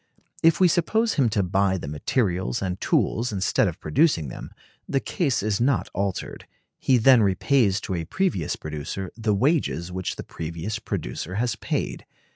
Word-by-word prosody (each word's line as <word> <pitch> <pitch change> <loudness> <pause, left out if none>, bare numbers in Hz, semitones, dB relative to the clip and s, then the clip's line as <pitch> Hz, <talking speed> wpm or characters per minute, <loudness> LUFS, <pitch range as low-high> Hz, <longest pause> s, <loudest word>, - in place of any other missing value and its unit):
If 165 0 +4
we 185 - +6
suppose 220 +7 +1
him 130 -5 +2
to 105 -2 +1
buy 95 +1 +1
the 85 - -7
materials 95 - -1
and 90 -1 -3
tools 120 +1 +1
instead 100 -2 +1
of - - -4
producing 80 - +2
them, - - -8 0.4
the 135 - +2
case 135 - -1
is 105 0 0
not 130 0 +1
altered: 100 -2 -3 0.3
he 130 - +3
then 125 +1 +6
repays 100 +1 +2
to - - -4
a 85 -2 -2
previous 100 - -1
producer 80 +5 -5
the 110 -2 0
wages 115 - +1
which 95 0 -3
that - - -7
previous 85 +7 -5
producer 95 -4 -4
has 120 +3 0
paid. - - -3
100 Hz, 165 wpm, -24 LUFS, 90-130 Hz, 0.4 s, we